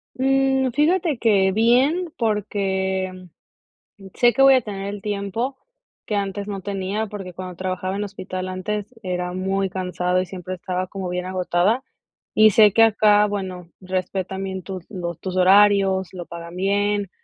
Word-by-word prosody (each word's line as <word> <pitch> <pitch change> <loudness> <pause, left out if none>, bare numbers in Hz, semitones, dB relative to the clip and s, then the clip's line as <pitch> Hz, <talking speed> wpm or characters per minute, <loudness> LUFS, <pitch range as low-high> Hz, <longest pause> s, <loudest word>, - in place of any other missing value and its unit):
Mm, 265 0 +2
fíjate 320 0 +2
que 195 -5 +3
bien, 265 - +2
porque, 190 -4 -1 0.7
mm, 195 -1 -12
sé 240 -1 +4
que 270 - +1
voy 270 0 +8
a 255 - +3
tener 200 -2 -6
el 205 - -7
tiempo 210 +6 -3 0.5
que 210 - -2
antes 200 0 -3
no 195 -2 -4
tenía, 200 +2 -3
porque 195 -3 -8
cuando 185 0 -7
trabajaba 185 +1 -3
en 205 - -2
hospital, 185 -2 -5
antes, 205 +4 -4
era 180 -1 -3
muy 190 +1 -1
cansado 180 -1 -1
y - - -3
siempre 185 0 -6
estaba 185 0 -3
como 190 -1 -5
bien 180 0 -3
agotada, 185 +6 0 0.5
y 215 0 +6
sé 210 0 +6
que 225 - +6
acá, 210 -1 +5
bueno, 185 -4 -5
respetan 190 +1 -3
bien 190 -1 -4
tus 185 -2 -7
los 175 -5 -5
tus 185 -1 -4
horarios, 195 0 +4
lo 175 -2 -7
pagan 170 0 -9
bien, 200 +1 0
195 Hz, 160 wpm, -22 LUFS, 185-210 Hz, 0.7 s, voy